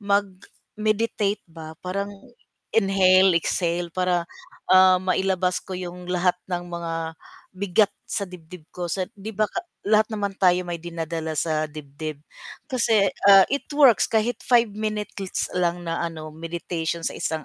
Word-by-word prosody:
mag-meditate 205 Hz, +1 st, -1 dB
ba 160 Hz, -1 st, -9 dB
parang 200 Hz, +2 st, -3 dB, 0.6 s
inhale, 190 Hz, -2 st, +5 dB
exhale 170 Hz, 0 st, -1 dB
para, 180 Hz, -1 st, +1 dB, 0.5 s
ah, 185 Hz, 0 st, +7 dB
mailabas 185 Hz, 0 st, 0 dB
ko 190 Hz, -, -8 dB
'yong 180 Hz, 0 st, -7 dB
lahat 180 Hz, 0 st, +2 dB
ng 175 Hz, -1 st, -2 dB
mga 170 Hz, -1 st, -4 dB, 0.6 s
bigat 200 Hz, +2 st, +2 dB, 0.2 s
sa 205 Hz, -, -1 dB
dibdib 180 Hz, -1 st, -12 dB
ko 180 Hz, -, -5 dB
sa 185 Hz, +2 st, -2 dB
'di 210 Hz, +2 st, -7 dB
ba 215 Hz, -1 st, +2 dB
ka 370 Hz, -, -3 dB, 0.3 s
lahat 215 Hz, 0 st, +4 dB
naman 200 Hz, -2 st, -2 dB
tayo 180 Hz, -1 st, +4 dB
may 175 Hz, -, -2 dB
dinadala 165 Hz, -1 st, -4 dB
sa 155 Hz, -1 st, 0 dB
dibdib 150 Hz, 0 st, -7 dB, 0.5 s
kasi, 225 Hz, -6 st, +3 dB, 0.2 s
ah, 195 Hz, -1 st, +9 dB
it 280 Hz, -, -1 dB
works 280 Hz, -6 st, +6 dB
kahit 225 Hz, +2 st, +1 dB
5 240 Hz, -2 st, +4 dB
minutes 215 Hz, 0 st, -4 dB
LITS 190 Hz, -1 st, -2 dB
lang 175 Hz, -1 st, 0 dB
na 165 Hz, -, -1 dB
ano 160 Hz, -2 st, -6 dB
meditation 165 Hz, +1 st, -4 dB
sa -, -, -2 dB
isang 160 Hz, -2 st, -2 dB
185 Hz, 145 wpm, -24 LUFS, 170-205 Hz, 0.6 s, ah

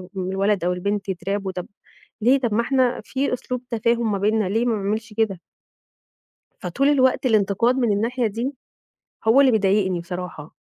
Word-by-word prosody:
للولد 195 Hz, +1 st, 0 dB
أو 180 Hz, +1 st, +1 dB
البنت 200 Hz, +2 st, -2 dB
يترعبوا، 195 Hz, +2 st, -3 dB
طب 180 Hz, -1 st, -6 dB, 0.5 s
ليه! 255 Hz, +5 st, +4 dB
طب 240 Hz, -5 st, -1 dB
ما 225 Hz, -, +3 dB
إحنا 255 Hz, 0 st, +1 dB
في 270 Hz, 0 st, -2 dB
أسلوب 250 Hz, 0 st, -4 dB
تفاهم 230 Hz, 0 st, +1 dB
ما 200 Hz, -, 0 dB
بيننا 210 Hz, 0 st, +1 dB
ليه 225 Hz, +4 st, +1 dB
ما 235 Hz, -2 st, +1 dB
أعملش 215 Hz, +2 st, -3 dB
كده؟ 210 Hz, -5 st, 0 dB, 1.2 s
فطول 210 Hz, +10 st, 0 dB
الوقت 260 Hz, -2 st, +3 dB
الإنتقاد 220 Hz, +1 st, +2 dB
من 240 Hz, -5 st, +2 dB
الناحية 230 Hz, +4 st, 0 dB
دي، 235 Hz, +6 st, -3 dB, 0.7 s
هو 225 Hz, +5 st, +5 dB
اللي 275 Hz, -2 st, +6 dB
بيضايقني 195 Hz, -3 st, +2 dB
بصراحة. 175 Hz, -3 st, -7 dB
215 Hz, 155 wpm, -22 LUFS, 195-240 Hz, 1.2 s, اللي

